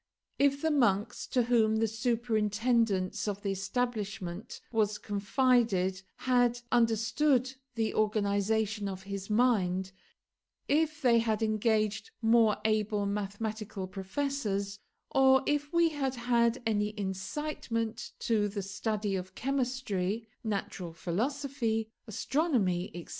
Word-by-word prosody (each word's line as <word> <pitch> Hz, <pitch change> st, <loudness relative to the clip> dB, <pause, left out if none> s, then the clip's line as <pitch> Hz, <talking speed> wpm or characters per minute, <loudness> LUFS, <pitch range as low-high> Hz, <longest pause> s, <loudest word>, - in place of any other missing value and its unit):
If 280 Hz, +1 st, +3 dB
the 320 Hz, -, +2 dB
monks 220 Hz, -7 st, +1 dB
to 250 Hz, -, +2 dB
whom 225 Hz, -2 st, +3 dB
the 225 Hz, +1 st, +2 dB
superintendence 220 Hz, -3 st, 0 dB
of 205 Hz, 0 st, -3 dB
the 200 Hz, -, 0 dB
establishment 200 Hz, -2 st, -3 dB
was 215 Hz, -2 st, +1 dB
confided 205 Hz, -3 st, +1 dB
had 245 Hz, -1 st, +2 dB
understood 240 Hz, +4 st, +2 dB, 0.2 s
the 225 Hz, -2 st, 0 dB
organisation 210 Hz, 0 st, +1 dB
of 190 Hz, 0 st, -6 dB
his 195 Hz, 0 st, -6 dB
mind, 190 Hz, -5 st, +2 dB, 0.8 s
if 310 Hz, 0 st, +1 dB
they 235 Hz, -2 st, +5 dB
had 225 Hz, -1 st, 0 dB
engaged 215 Hz, -, +1 dB
more 225 Hz, -2 st, +4 dB
able 215 Hz, -1 st, +1 dB
mathematical 205 Hz, 0 st, -3 dB
professors, 200 Hz, 0 st, -3 dB, 0.3 s
or 265 Hz, 0 st, +5 dB
if 290 Hz, 0 st, 0 dB
we 340 Hz, -1 st, +4 dB
had 275 Hz, -4 st, -2 dB
had 235 Hz, 0 st, +1 dB
any 210 Hz, -1 st, 0 dB
incitement 225 Hz, +3 st, -3 dB
to 215 Hz, -3 st, +2 dB
the 200 Hz, 0 st, -4 dB
study 205 Hz, +1 st, -2 dB
of 185 Hz, 0 st, -5 dB
chemistry, 235 Hz, -6 st, -1 dB, 0.2 s
natural 195 Hz, -5 st, -3 dB
philosophy, 225 Hz, -, -2 dB, 0.2 s
astronomy, 215 Hz, -, 0 dB
etc. 175 Hz, -, -8 dB
220 Hz, 110 wpm, -30 LUFS, 200-245 Hz, 0.8 s, they